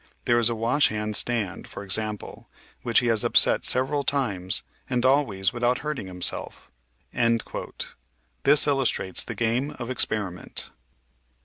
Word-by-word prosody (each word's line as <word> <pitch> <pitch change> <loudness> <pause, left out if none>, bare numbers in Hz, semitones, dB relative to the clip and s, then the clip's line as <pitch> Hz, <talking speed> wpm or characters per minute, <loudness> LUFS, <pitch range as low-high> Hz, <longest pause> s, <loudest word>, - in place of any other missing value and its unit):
There 120 0 +2
is 120 0 +3
a 115 - -3
washhand 110 -3 0
stand, 110 -6 -1
for - - -9
example, 105 +2 -2 0.3
which 120 0 +2
he - - -4
has 115 -3 +3
upset - - +3
several 135 +3 +2
times, 100 -11 +2 0.3
and 125 -1 -1
always 115 -9 +1
without 120 +1 0
hurting 150 -10 -4
himself." 90 -8 -1 1.7
This 145 +1 +5
illustrates 135 - 0
the - - -7
game 120 +5 -2
of 120 -1 -7
experi 105 -6 -1
ment. 90 - -4
115 Hz, 130 wpm, -24 LUFS, 100-130 Hz, 1.7 s, This